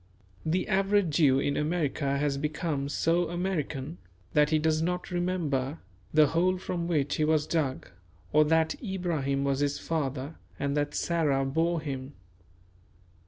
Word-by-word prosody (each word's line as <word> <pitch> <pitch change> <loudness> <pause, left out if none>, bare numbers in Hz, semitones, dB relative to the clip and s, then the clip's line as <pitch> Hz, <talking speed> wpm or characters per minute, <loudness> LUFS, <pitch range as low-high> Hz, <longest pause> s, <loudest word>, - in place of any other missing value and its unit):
The 175 +4 0
average 195 -4 +2
Jew 140 -5 +5
in 140 +1 0
America 150 -3 0
has 140 -1 0
become 150 -1 -2
so 165 +3 +1
American 160 - -3 0.3
that 150 0 +4
he 155 - +3
does 155 0 +1
not 180 +2 -2
remember 165 -6 -1 0.3
the 155 0 +6
hole 175 +5 +2
from 175 -2 -3
which 145 -5 0
he 155 - +1
was 155 -1 +2
dug, 145 -6 -1 0.5
or 155 +1 +6
that 160 +1 +2
Abraham 170 - -1
was 140 -1 0
his 145 0 0
father 145 -2 -3 0.2
and 140 0 -1
that 145 0 -1
Sarah 150 -6 +1
bore 165 +4 0
him. 135 -2 -5
155 Hz, 145 wpm, -28 LUFS, 140-170 Hz, 0.5 s, the